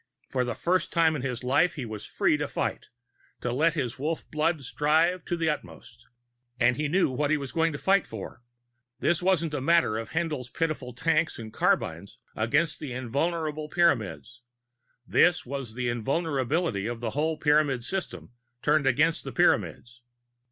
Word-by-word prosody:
For 125 Hz, -, +1 dB
the 120 Hz, -1 st, -3 dB
first 180 Hz, +2 st, 0 dB
time 165 Hz, -2 st, +3 dB
in 145 Hz, -, -3 dB
his 125 Hz, -2 st, -3 dB
life, 140 Hz, +8 st, +2 dB
he 135 Hz, -6 st, -4 dB
was 110 Hz, -2 st, -7 dB
free -, -, +2 dB
to -, -, -2 dB
fight -, -, -3 dB, 0.5 s
to 120 Hz, -, -2 dB
let 160 Hz, +6 st, +2 dB
his 130 Hz, -3 st, -3 dB
Wolf 155 Hz, +4 st, -3 dB
blood 155 Hz, -1 st, 0 dB
strive 155 Hz, +7 st, +2 dB
to 175 Hz, -, -2 dB
the 165 Hz, -1 st, 0 dB
utmost 90 Hz, -, -5 dB, 0.5 s
and 125 Hz, -, +4 dB
he 150 Hz, +3 st, -1 dB
knew 175 Hz, -1 st, +2 dB
what 145 Hz, +3 st, 0 dB
he 155 Hz, -, +3 dB
was 140 Hz, -2 st, -6 dB
fighting 165 Hz, +4 st, +2 dB
for. 110 Hz, +2 st, -8 dB, 0.6 s
This 170 Hz, 0 st, +1 dB
wasn't 175 Hz, -4 st, +1 dB
a 145 Hz, -, -2 dB
matter 150 Hz, -7 st, +3 dB
of 115 Hz, -, -6 dB
Haendl's 155 Hz, -7 st, -2 dB
pitiful 155 Hz, -5 st, -2 dB
tanks 155 Hz, +6 st, +1 dB
and 110 Hz, -2 st, -8 dB
carbines -, -, 0 dB, 0.2 s
against 145 Hz, +9 st, +1 dB
the 145 Hz, -5 st, -5 dB
invulnerable 150 Hz, +5 st, -2 dB
Pyramids; 125 Hz, -, 0 dB, 0.6 s
this 175 Hz, +6 st, +3 dB
was 130 Hz, -4 st, -5 dB
the 125 Hz, 0 st, -2 dB
invulnerability 135 Hz, -, -1 dB
of 120 Hz, -1 st, -4 dB
the 115 Hz, -2 st, -3 dB
whole 155 Hz, +4 st, 0 dB
Pyramid 150 Hz, -4 st, +2 dB
system 115 Hz, -, -5 dB, 0.3 s
turned 150 Hz, -1 st, +3 dB
against 155 Hz, +5 st, +2 dB
the -, -, -6 dB
Pyramids! 120 Hz, 0 st, +1 dB
145 Hz, 165 wpm, -27 LUFS, 125-165 Hz, 0.6 s, and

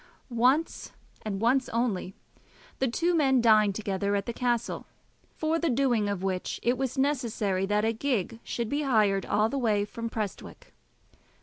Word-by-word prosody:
Once, 255 Hz, +7 st, +1 dB, 0.3 s
and 200 Hz, -3 st, -4 dB
once 255 Hz, +3 st, +2 dB
only, 215 Hz, -6 st, -1 dB, 0.6 s
the 265 Hz, -, +2 dB
two 340 Hz, +9 st, 0 dB
men 270 Hz, -5 st, +3 dB
dined 215 Hz, -4 st, +4 dB
together 200 Hz, -1 st, -1 dB
at 200 Hz, 0 st, -1 dB
the 235 Hz, -, -4 dB
castle, 240 Hz, -1 st, -1 dB, 0.5 s
for 320 Hz, +1 st, 0 dB
the 335 Hz, -, 0 dB
doing 240 Hz, -5 st, +1 dB
of 200 Hz, -2 st, -3 dB
which 185 Hz, -1 st, -2 dB
it 240 Hz, +1 st, +2 dB
was 260 Hz, 0 st, -3 dB
necessary 230 Hz, -9 st, 0 dB
that 210 Hz, +1 st, +1 dB
a 225 Hz, -, +1 dB
gig 230 Hz, -3 st, -2 dB
should 235 Hz, -2 st, -3 dB
be 285 Hz, +6 st, -1 dB
hired 215 Hz, -8 st, +2 dB
all 215 Hz, +1 st, +2 dB
the 275 Hz, +4 st, -2 dB
way 210 Hz, -4 st, +1 dB
from 230 Hz, +2 st, -6 dB
Prestwick. 215 Hz, -4 st, -6 dB
230 Hz, 165 wpm, -28 LUFS, 205-265 Hz, 0.6 s, dined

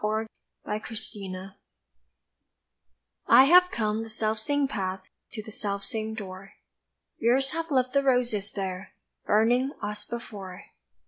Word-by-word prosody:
DOORYARD 215 Hz, +1 st, 0 dB, 0.4 s
ROSES 200 Hz, -3 st, -5 dB, 1.8 s
I 260 Hz, -, +9 dB
HAVE 360 Hz, +5 st, +7 dB
come 215 Hz, -5 st, -1 dB
the 225 Hz, -, -7 dB
selfsame 220 Hz, +6 st, 0 dB
path 190 Hz, -6 st, -3 dB, 0.3 s
To 215 Hz, -, -5 dB
the 220 Hz, -, -10 dB
selfsame 215 Hz, +2 st, -3 dB
door, 195 Hz, -2 st, -8 dB, 0.7 s
Years 260 Hz, +4 st, +3 dB
have 330 Hz, +1 st, -3 dB
left 255 Hz, -3 st, +2 dB
the 280 Hz, -, +4 dB
roses 245 Hz, -6 st, +1 dB
there 190 Hz, -1 st, -5 dB, 0.3 s
Burning 245 Hz, +6 st, +3 dB
as 210 Hz, 0 st, -3 dB
before. 200 Hz, -5 st, -7 dB
220 Hz, 115 wpm, -27 LUFS, 200-250 Hz, 1.8 s, I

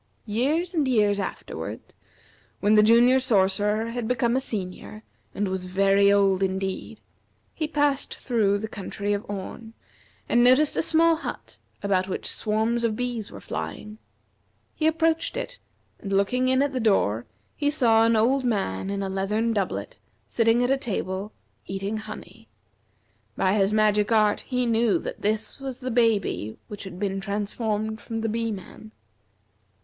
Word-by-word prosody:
Years 290 Hz, -, 0 dB
and 305 Hz, -5 st, +1 dB
years 210 Hz, -5 st, +2 dB
afterward, 195 Hz, -, -6 dB, 0.7 s
when 205 Hz, +1 st, +3 dB
the 210 Hz, -, +7 dB
Junior 235 Hz, +4 st, +5 dB
Sorcerer 210 Hz, -1 st, +1 dB
had 240 Hz, -1 st, -3 dB
become 240 Hz, 0 st, +1 dB
a 265 Hz, -, +1 dB
Senior 215 Hz, -1 st, -6 dB, 0.3 s
and 205 Hz, 0 st, 0 dB
was 185 Hz, -1 st, -3 dB
very 195 Hz, +2 st, +3 dB
old 195 Hz, -1 st, +3 dB
indeed, 190 Hz, 0 st, -3 dB, 0.5 s
he 310 Hz, -, -2 dB
passed 290 Hz, -2 st, 0 dB
through 215 Hz, -5 st, +1 dB
the 220 Hz, +2 st, -4 dB
country 205 Hz, 0 st, -4 dB
of 205 Hz, +1 st, -2 dB
Orn, 215 Hz, +3 st, -7 dB, 0.5 s
and 240 Hz, 0 st, +4 dB
noticed 260 Hz, +4 st, +5 dB
a -, -, +2 dB
small 330 Hz, 0 st, +3 dB
hut -, -, -7 dB, 0.2 s
about 190 Hz, -2 st, +1 dB
which 190 Hz, -, -4 dB
swarms 220 Hz, +2 st, 0 dB
of 225 Hz, -2 st, +1 dB
bees 240 Hz, -3 st, -3 dB
were -, -, -9 dB
flying. 215 Hz, +1 st, -6 dB, 0.7 s
He 315 Hz, -, 0 dB
approached 325 Hz, +4 st, +1 dB
it, -, -, -5 dB, 0.4 s
and 200 Hz, -, -7 dB
looking 200 Hz, +6 st, +2 dB
in 260 Hz, +1 st, +3 dB
at 285 Hz, -1 st, -1 dB
the 255 Hz, -, -1 dB
door 120 Hz, -, +1 dB, 0.3 s
he 290 Hz, -1 st, +1 dB
saw 235 Hz, -7 st, +4 dB
an 230 Hz, 0 st, +3 dB
old 255 Hz, +5 st, +3 dB
man 195 Hz, -, -1 dB
in 200 Hz, 0 st, -2 dB
a -, -, -2 dB
leathern 210 Hz, +4 st, 0 dB
doublet, 200 Hz, -4 st, -3 dB, 0.3 s
sitting 230 Hz, +1 st, +3 dB
at 250 Hz, -, +1 dB
a 270 Hz, -, +3 dB
table, 200 Hz, -4 st, -3 dB, 0.4 s
eating 195 Hz, +3 st, -3 dB
honey. 215 Hz, 0 st, -10 dB, 0.9 s
By 190 Hz, -, +2 dB
his 200 Hz, -1 st, +2 dB
magic 210 Hz, 0 st, +2 dB
art 215 Hz, -2 st, +3 dB
he 250 Hz, -1 st, 0 dB
knew 230 Hz, -2 st, +2 dB
this 215 Hz, +4 st, -2 dB
was 265 Hz, -2 st, -5 dB
the 255 Hz, -1 st, -4 dB
baby 220 Hz, -, +1 dB
which 205 Hz, -1 st, -7 dB
had 180 Hz, -2 st, -8 dB
been 195 Hz, 0 st, -2 dB
transformed 210 Hz, +1 st, -2 dB
from 225 Hz, +2 st, -4 dB
the 225 Hz, -, -1 dB
Bee 230 Hz, +1 st, -1 dB
man. 215 Hz, +2 st, -9 dB
220 Hz, 155 wpm, -25 LUFS, 200-245 Hz, 0.9 s, the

